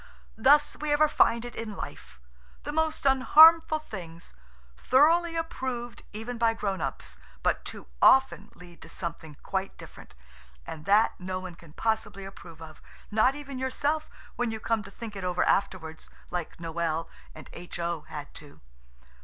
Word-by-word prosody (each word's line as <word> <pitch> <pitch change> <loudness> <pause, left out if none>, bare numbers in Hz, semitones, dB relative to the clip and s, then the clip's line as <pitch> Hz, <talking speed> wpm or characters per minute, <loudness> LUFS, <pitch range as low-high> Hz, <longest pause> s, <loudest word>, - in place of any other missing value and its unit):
Thus 290 +5 +5
we 300 0 -3
ever 300 +1 +4
find 235 -5 +2
it 240 - -8
in 220 -2 -5
life–the - - -10
most 315 -1 -1
unharmful 310 +4 +7
things, 170 - -9 0.4
thoroughly 330 - +3
approved 260 -7 -4
even 225 +3 -6
by 230 -1 +3
grow 200 -3 -1
ups, 190 - -5 0.2
but - - +1
too - - -7 0.2
often 265 -6 +4
lead 175 -1 -15
to 160 - -12
something 165 -4 -6
quite 190 0 -3
different, - - -13 0.5
and 155 - -8
that 205 +3 +4
no 185 0 -4
one 185 -1 -8
can 165 -2 -17
possibly 220 -2 -2
approve 170 -4 -11
of, 155 -1 -13 0.3
not 220 +6 +3
even 280 -3 -7
yourself 290 +4 -1 0.3
when 245 -1 0
you 220 0 -4
come 225 0 0
to 200 - -11
think 215 +1 -9
it 195 - -6
over 180 -1 0
afterwards, 165 -5 -1 0.2
like 175 -2 -4
Noël 165 -1 -2 0.3
and - - -11
H.O. 170 -2 -4
had 145 -1 -8
to. 145 -2 -12
210 Hz, 155 wpm, -28 LUFS, 170-265 Hz, 0.5 s, unharmful